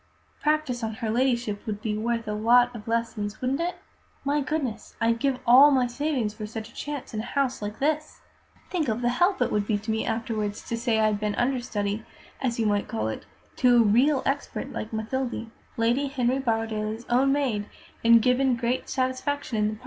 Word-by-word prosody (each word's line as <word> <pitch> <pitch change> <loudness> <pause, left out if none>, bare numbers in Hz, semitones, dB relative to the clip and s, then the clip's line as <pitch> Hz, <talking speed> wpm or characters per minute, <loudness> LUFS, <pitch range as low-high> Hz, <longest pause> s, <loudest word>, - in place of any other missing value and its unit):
Practice 300 -6 0
on 220 -1 -2
her 220 -1 -2
Ladyship 235 -4 0
would 210 -2 -3
be 215 0 -2
worth 230 +1 -1
a 210 - -1
lot 240 +3 +4
of 215 -1 -9
lessons, 225 -2 -2
wouldn't 255 +2 -1
it? 350 +1 -1 0.5
My 290 +1 +1
goodness! 265 -4 -3
I'd 230 0 +2
give 275 -1 +1
all 260 +5 +8
my 260 -3 +3
savings 245 -3 -1
for 215 -1 -6
such 220 0 -6
a - - -19
chance 290 -5 -6
in 215 - -2
a - - -2
house 265 -4 +1
like 210 +1 -5
this! 305 +2 -1 0.5
Think 335 -6 0
of 225 +2 -1
the 240 - +3
help 355 +10 +2
it - - -2
would 210 -1 0
be 210 - +2
to 215 +2 -4
me 220 0 0
afterwards 220 -2 -2
to 230 - 0
say 230 -1 +1
I'd 215 -1 +2
been 210 -1 -1
understudy, 225 -5 -1 0.4
as 240 -3 -1
you 225 - +2
might 205 -1 +1
call 110 0 -2
it, 110 - -6 0.3
to 245 -1 +5
a 235 - +7
real 255 +7 +3
expert 275 +1 -2
like 215 - -5
Mathilde, 230 +1 -3 0.3
Lady 240 +5 +2
Henry 260 -1 0
Borrowdaile's 225 -2 -2
own 260 +3 +3
maid, 250 -8 0 0.4
and 230 -1 +6
given 255 0 +3
great 235 +2 -2
satisfaction 260 0 -1
in 210 - +2
the 215 - -2
part! - - -16
235 Hz, 200 wpm, -26 LUFS, 220-265 Hz, 0.5 s, all